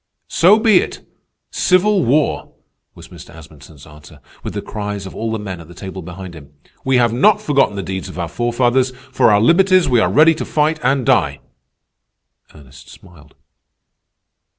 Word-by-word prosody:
"So 190 Hz, +6 st, +5 dB
be 220 Hz, -4 st, +4 dB
it, -, -, -6 dB, 0.4 s
civil 185 Hz, +1 st, +2 dB
war," 145 Hz, +5 st, 0 dB, 0.4 s
was -, -, -14 dB
Mr. -, -, -14 dB
Asmunsen's 75 Hz, -2 st, -15 dB
answer, 75 Hz, 0 st, -16 dB, 0.2 s
with -, -, -7 dB
the -, -, -3 dB
cries 105 Hz, -2 st, -6 dB
of 95 Hz, -, -9 dB
all 115 Hz, 0 st, -4 dB
the 110 Hz, -, -2 dB
men 95 Hz, -4 st, -7 dB
at 80 Hz, -, -14 dB
the 85 Hz, -, -15 dB
table 95 Hz, 0 st, -8 dB
behind 90 Hz, +1 st, -10 dB
him. 75 Hz, -3 st, -14 dB, 0.3 s
"We 130 Hz, 0 st, 0 dB
have 120 Hz, -2 st, +2 dB
not 195 Hz, -, +3 dB
forgotten 135 Hz, -7 st, 0 dB
the 100 Hz, -, -4 dB
deeds 95 Hz, 0 st, -6 dB
of 95 Hz, -, -11 dB
our 85 Hz, -2 st, -3 dB
forefathers. 120 Hz, +6 st, 0 dB, 0.2 s
For 125 Hz, -, +3 dB
our 105 Hz, -1 st, +4 dB
liberties 185 Hz, -, +3 dB
we 125 Hz, -3 st, +2 dB
are -, -, +1 dB
ready 160 Hz, +3 st, +5 dB
to 160 Hz, -, -5 dB
fight 155 Hz, +1 st, -1 dB
and 130 Hz, 0 st, 0 dB
die." -, -, +1 dB, 1.2 s
Ernest 70 Hz, -2 st, -16 dB
smiled. 80 Hz, -6 st, -18 dB
110 Hz, 175 wpm, -17 LUFS, -, 1.2 s, So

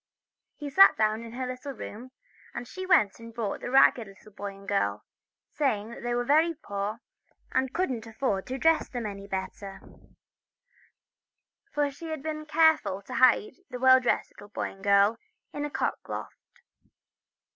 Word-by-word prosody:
He 290 Hz, -1 st, -7 dB
sat 390 Hz, +6 st, +7 dB
down 215 Hz, 0 st, +1 dB
in 230 Hz, 0 st, -10 dB
her 255 Hz, +1 st, -3 dB
little 255 Hz, +2 st, -6 dB
room, 235 Hz, +1 st, -9 dB, 0.5 s
and 240 Hz, -, -5 dB
she 370 Hz, +7 st, -7 dB
went 215 Hz, -, +4 dB
and 230 Hz, 0 st, -10 dB
brought 225 Hz, -3 st, -3 dB
the -, -, -4 dB
ragged 250 Hz, -3 st, +5 dB
little 195 Hz, +2 st, -16 dB
boy 200 Hz, 0 st, -7 dB
and 195 Hz, 0 st, -15 dB
girl, 105 Hz, -, -1 dB, 0.5 s
saying 230 Hz, -6 st, -1 dB
she 240 Hz, 0 st, -1 dB
was 245 Hz, 0 st, -1 dB
very 315 Hz, +5 st, +3 dB
poor, 205 Hz, -5 st, -5 dB, 0.5 s
and 260 Hz, 0 st, 0 dB
couldn't 255 Hz, -11 st, -2 dB
afford 220 Hz, -4 st, -2 dB
to 260 Hz, +1 st, -3 dB
dress 325 Hz, +3 st, +2 dB
them 245 Hz, -3 st, -4 dB, 0.2 s
better; 195 Hz, 0 st, -5 dB, 1.9 s
for 290 Hz, -1 st, 0 dB
she 325 Hz, +4 st, -9 dB
had 315 Hz, -3 st, -5 dB
been 305 Hz, -1 st, -5 dB
careful 315 Hz, -12 st, +3 dB
to -, -, -9 dB
hide 260 Hz, -, +4 dB
the 250 Hz, -, -5 dB
well 260 Hz, +1 st, +6 dB
dressed 245 Hz, -, 0 dB
little 205 Hz, -, -14 dB
boy -, -, -4 dB
and 195 Hz, -, -17 dB
girl 200 Hz, +2 st, +4 dB, 0.4 s
in 290 Hz, 0 st, -3 dB
a -, -, -4 dB
cockloft. 390 Hz, -, -5 dB
245 Hz, 160 wpm, -28 LUFS, 205-290 Hz, 1.9 s, sat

